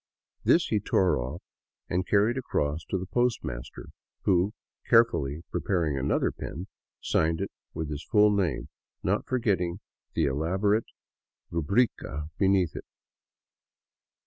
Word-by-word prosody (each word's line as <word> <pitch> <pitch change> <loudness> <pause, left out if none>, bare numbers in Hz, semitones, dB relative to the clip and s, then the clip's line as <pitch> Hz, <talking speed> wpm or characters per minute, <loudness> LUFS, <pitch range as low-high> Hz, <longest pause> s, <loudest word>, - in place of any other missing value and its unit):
This 170 - +4
he 105 - +2
tore 95 -5 +2
off 65 +8 -5 0.4
and 90 +2 -1
carried 105 +4 +3
across 80 - -1
to 95 - -1
the 95 - -4
postmaster 115 - -2 0.3
who, 95 +1 +3 0.4
carefully 85 - +3
preparing 85 -7 0
another 65 0 +1
pen, 85 +5 -6 0.4
signed 80 0 +1
it 100 - -3 0.2
with 80 -1 -3
his 75 0 -4
full 105 -1 +4
name, 95 -10 0 0.3
not - - 0
forgetting 95 -8 0 0.4
the 80 - +3
elaborate 95 +10 +1 0.6
ruhrica 85 - 0
beneath 95 -4 +3
it. - - -6
90 Hz, 120 wpm, -28 LUFS, 80-105 Hz, 0.6 s, This